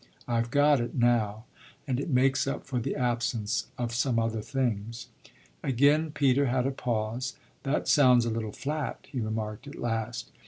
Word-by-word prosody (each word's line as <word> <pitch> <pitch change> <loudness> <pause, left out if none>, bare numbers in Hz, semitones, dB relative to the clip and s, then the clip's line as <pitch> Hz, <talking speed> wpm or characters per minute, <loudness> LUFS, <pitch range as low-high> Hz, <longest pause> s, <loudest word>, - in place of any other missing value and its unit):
I've 115 -1 0
got 145 +2 +4
it 120 - -4
now; 115 -3 +1 0.4
and 130 -2 0
it 140 - -3
makes 135 0 +3
up 135 - -3
for 130 -2 -2
the 115 - -2
absence 120 -4 -1
of 120 -1 -2
some 120 0 +1
other 115 -1 0
things." 115 -3 -2 0.5
Again 145 +5 +3
Peter 140 -2 +2
had 125 0 +1
a 135 - +1
pause. 120 0 -2 0.3
"That 140 +1 -1
sounds 125 -4 +5
a 115 - -1
little 110 -1 -3
flat," 150 +4 -4
he 130 - -3
remarked 110 +2 -3
at 145 - -8
last. 115 0 -3
120 Hz, 165 wpm, -28 LUFS, 115-135 Hz, 0.5 s, sounds